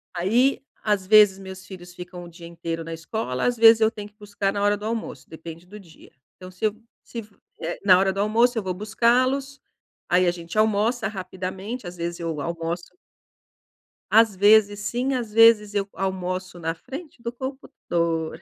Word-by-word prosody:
Aí, 235 +10 +2 0.2
às 205 -3 0
vezes, 210 -2 +6
meus 190 -1 -10
filhos 180 -2 -11
ficam 180 0 -9
o 175 - -10
dia 170 0 -13
inteiro 165 -1 -5
na 165 0 -7
escola, 165 - -3
às 245 0 +1
vezes 225 0 +7
eu 220 - +5
tenho 210 -2 -8
que 210 - -23
buscar 200 -1 -2
na 200 - -2
hora 205 0 +3
do 210 - -8
almoço, 225 0 -5
depende 165 +1 -10
do 210 +3 -12
dia. 170 -5 -17 0.2
Então 185 0 -11
se 185 +4 -4
eu 210 - +1 0.3
se 235 - -7
f 210 -2 -12 0.2
eh, 165 +2 -4
na 185 -2 +7
hora 190 +1 +2
do 195 - -5
almoço 235 +3 +2
eu 220 - -1
vou 185 -1 -2
buscá-los, 255 +7 +1 0.5
aí 180 0 +3
a - - +4
gente 170 +2 -8
almoça 220 +2 +2
rapidamente, 190 +2 -6
às 180 - -9
vezes 170 0 -4
eu 165 -3 -3
almoço 170 +2 -4 1.2
Às 220 -1 +5
vezes 205 +1 +5
sim, 250 +5 -1
às 235 -4 -3
vezes 225 -2 +5
eu 200 -1 -1
almoço 185 -1 -4
na 165 0 -2
frente 275 - -10
do 235 -1 -4
computador. 170 - -3
200 Hz, 185 wpm, -24 LUFS, 175-220 Hz, 1.2 s, vezes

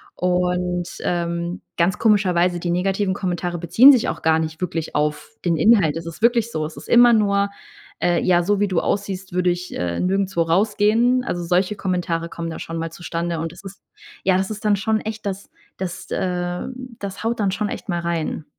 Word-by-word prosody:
Und, 180 0 0 0.2
ähm, 170 0 -2 0.2
ganz 175 +2 +1
komischerweise, 180 -5 +3
die 175 - -2
negativen 190 +2 0
Kommentare 175 -2 -2
beziehen 180 - +7
sich 255 -5 +3
auch - - -3
gar 160 0 +3
nicht 160 +1 -4
wirklich 165 -3 -3
auf 150 +4 -1
den 170 -2 +1
Inhalt. 165 -3 +4
Es 165 - -6
ist 170 +5 -8
wirklich 235 -1 +3
so. 155 -1 -1
Es 155 - -8
ist - - -10
immer 240 0 +7
nur, 200 -2 +2 0.5
äh, 175 -1 +2
ja, 175 -1 +3
so 205 +2 +1
wie 205 - +2
du 180 -3 +1
aussiehst, 195 -2 -3
würde 180 0 +2
ich, 175 +1 -3
äh, 85 -1 -2
nirgendswo 190 -2 +1
rausgehen. 215 +7 +2
Also, 175 -7 -3
solche 180 +4 +1
Kommentare 175 -4 -2
kommen 165 0 -5
da 160 - -6
schon 165 0 -5
mal 165 0 -4
zustande. 170 -1 -3
Und 165 0 -4
das 175 +3 -14
ist 195 +1 -10 0.4
ja, 185 -1 +3
es 190 +1 -1
ist 215 0 -6
dann 210 -1 +3
schon 215 +2 0
echt 220 0 -6
das 200 0 -4 0.3
das 185 0 -6
äh, 180 -1 -2 0.3
das 200 +1 -6
haut 230 0 0
dann 200 -2 +1
schon 205 +2 -1
echt 205 - -7
mal 175 -1 0
rein. 170 -2 -3
180 Hz, 200 wpm, -21 LUFS, 170-200 Hz, 0.5 s, beziehen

